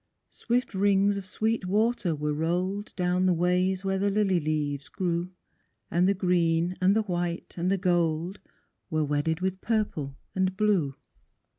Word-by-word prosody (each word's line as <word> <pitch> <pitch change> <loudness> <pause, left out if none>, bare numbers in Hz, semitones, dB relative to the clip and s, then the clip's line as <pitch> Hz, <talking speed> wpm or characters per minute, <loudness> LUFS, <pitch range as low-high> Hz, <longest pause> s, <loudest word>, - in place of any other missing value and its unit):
Swift 245 -1 -1
rings 200 +1 +3
of 195 -1 -5
sweet 220 0 -1
water 210 -3 +1
were 150 0 -1
rolled 180 +6 -1
Down 180 0 +1
the 180 - +3
ways 180 +2 +1
where 195 0 0
the 200 +1 +2
lily 195 -3 +2
leaves 150 -2 -2
grew, 175 -2 -2 0.6
And 180 +2 +3
the 200 - +2
green, 175 -2 +1
and 190 +2 +4
the 220 - +2
white, 175 -3 -3
and 175 +1 -1
the 195 - +2
gold, 175 0 0 0.5
Were 155 -2 +1
wedded 150 +3 0
with 190 0 -2
purple 185 -12 -1 0.2
and 190 0 0
blue. 185 -10 +2
180 Hz, 155 wpm, -27 LUFS, 165-195 Hz, 0.6 s, and